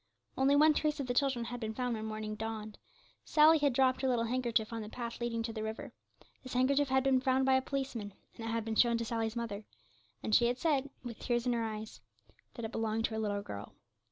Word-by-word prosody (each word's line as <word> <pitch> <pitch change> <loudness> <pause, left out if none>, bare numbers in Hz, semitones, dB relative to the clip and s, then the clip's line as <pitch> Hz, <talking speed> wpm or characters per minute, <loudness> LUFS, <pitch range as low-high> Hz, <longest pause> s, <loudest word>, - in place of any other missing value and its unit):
Only 270 +2 +4
one 305 +2 +6
trace 300 0 0
of 280 - -1
the 245 - -1
children 255 -2 +1
had 245 +1 -5
been 220 -1 -4
found 250 0 -1
when 220 0 -5
morning 215 0 -4
dawned; 215 0 -5 0.4
Sally 310 +1 +6
had 285 -1 +3
dropped 255 +1 +2
her 265 - +1
little 240 -2 +2
handkerchief 235 -2 0
on 225 - -3
the 210 - -7
path 235 0 -6
leading 230 -1 -1
to 225 0 -4
the 220 - -4
river; 220 0 -5 0.5
this 255 - -8
handkerchief 275 +3 +3
had 265 0 +3
been 265 -1 +3
found 260 0 +2
by 265 - +4
a 260 - +4
policeman, 260 -6 -4 0.2
and 225 - -8
it - - -2
had 225 -1 -1
been 225 - -2
shown 235 +1 +4
to 230 - -2
Sally's 225 0 -2
mother, 225 -3 -4 0.6
and 215 - -2
she 235 +1 +6
had 245 +1 0
said, 285 -3 +1
with 235 -3 -7
tears 240 -1 0
in 245 - +2
her 230 -1 0
eyes, 215 -1 -6 0.5
that 235 - -5
it 220 - -5
belonged 225 0 0
to - - -2
her 220 - -2
little 205 -2 -1
girl. 100 - -8
235 Hz, 240 wpm, -33 LUFS, 220-260 Hz, 0.6 s, one